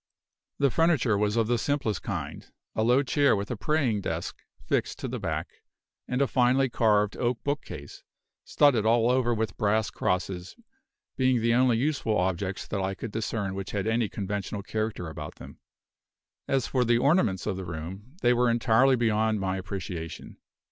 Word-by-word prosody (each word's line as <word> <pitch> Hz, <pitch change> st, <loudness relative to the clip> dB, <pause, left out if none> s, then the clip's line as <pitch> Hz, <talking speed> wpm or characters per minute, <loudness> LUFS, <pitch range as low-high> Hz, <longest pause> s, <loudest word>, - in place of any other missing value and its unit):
The 140 Hz, -2 st, +2 dB
furniture 155 Hz, -9 st, +3 dB
was 105 Hz, +1 st, +1 dB
of 115 Hz, -, +3 dB
the 120 Hz, +1 st, +1 dB
simplest 135 Hz, -, -1 dB
kind; -, -, -5 dB, 0.2 s
a -, -, -1 dB
low 125 Hz, +5 st, +4 dB
chair 140 Hz, 0 st, +3 dB
with 100 Hz, +2 st, -4 dB
a -, -, -1 dB
praying 120 Hz, -2 st, 0 dB
desk -, -, -4 dB, 0.2 s
fixed -, -, -1 dB
to -, -, -4 dB
the -, -, -4 dB
back, -, -, -4 dB, 0.5 s
and 125 Hz, +2 st, +1 dB
a -, -, +1 dB
finely 130 Hz, +1 st, +3 dB
carved 105 Hz, -3 st, +2 dB
oak 120 Hz, -1 st, -1 dB
book 145 Hz, +1 st, -1 dB
case, -, -, -10 dB, 0.4 s
studded 135 Hz, -7 st, +3 dB
all 115 Hz, +2 st, +3 dB
over 125 Hz, -1 st, +2 dB
with 110 Hz, -4 st, -2 dB
brass 105 Hz, +1 st, +1 dB
crosses, 90 Hz, 0 st, -2 dB, 0.6 s
being 130 Hz, -2 st, +3 dB
the 115 Hz, +1 st, +2 dB
only 125 Hz, -1 st, +4 dB
useful 125 Hz, -5 st, 0 dB
objects 95 Hz, +1 st, -1 dB
that 100 Hz, -, -3 dB
I 95 Hz, +1 st, -2 dB
could 110 Hz, -, -6 dB
discern 110 Hz, -3 st, -2 dB
which 95 Hz, 0 st, -6 dB
had 100 Hz, -1 st, -1 dB
any 110 Hz, -1 st, +1 dB
conventional 100 Hz, 0 st, -4 dB
character 110 Hz, -5 st, -3 dB
about 75 Hz, -1 st, -7 dB
them. -, -, -12 dB, 0.9 s
As 135 Hz, -3 st, +1 dB
for 130 Hz, -2 st, +1 dB
the 120 Hz, 0 st, +3 dB
ornaments 130 Hz, -, +2 dB
of 105 Hz, -, -1 dB
the 95 Hz, -, -5 dB
room, 90 Hz, -, -7 dB
they 120 Hz, 0 st, +5 dB
were 120 Hz, 0 st, +3 dB
entirely 120 Hz, +3 st, +4 dB
beyond 110 Hz, -2 st, +1 dB
my 95 Hz, -1 st, -1 dB
appreciation. 90 Hz, -4 st, -6 dB
110 Hz, 175 wpm, -27 LUFS, 100-125 Hz, 0.9 s, they